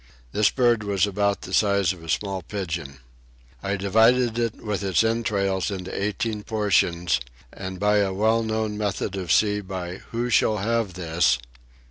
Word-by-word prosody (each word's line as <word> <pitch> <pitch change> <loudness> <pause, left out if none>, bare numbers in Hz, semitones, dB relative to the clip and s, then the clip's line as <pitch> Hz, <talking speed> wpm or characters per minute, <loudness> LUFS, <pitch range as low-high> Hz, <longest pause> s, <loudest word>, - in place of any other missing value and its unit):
This 105 - +3
bird 120 -4 +2
was 100 -3 +1
about 100 0 0
the - - -8
size 100 -3 +3
of 85 -3 -14
a 80 - -10
small 95 +3 -1
pigeon. 80 -8 -5 0.6
I 100 +1 -1
divided 115 +4 +3
it 115 -1 0
with 105 -3 -4
its 95 0 +2
entrails 100 -5 0
into 95 -2 -5
18 105 +2 -2
portions, 95 -7 +1 0.3
and 95 -1 -6
by 105 +1 +3
a 100 -2 +2
well 110 +4 +2
known 110 -1 -2
method 100 -1 -2
at 95 -3 -5
sea 105 +4 +3
of 100 -2 -11 0.4
Who 120 +1 -2
shall 110 -1 +3
have 110 -1 -1
this? 80 -7 +2
100 Hz, 160 wpm, -24 LUFS, 95-110 Hz, 0.6 s, This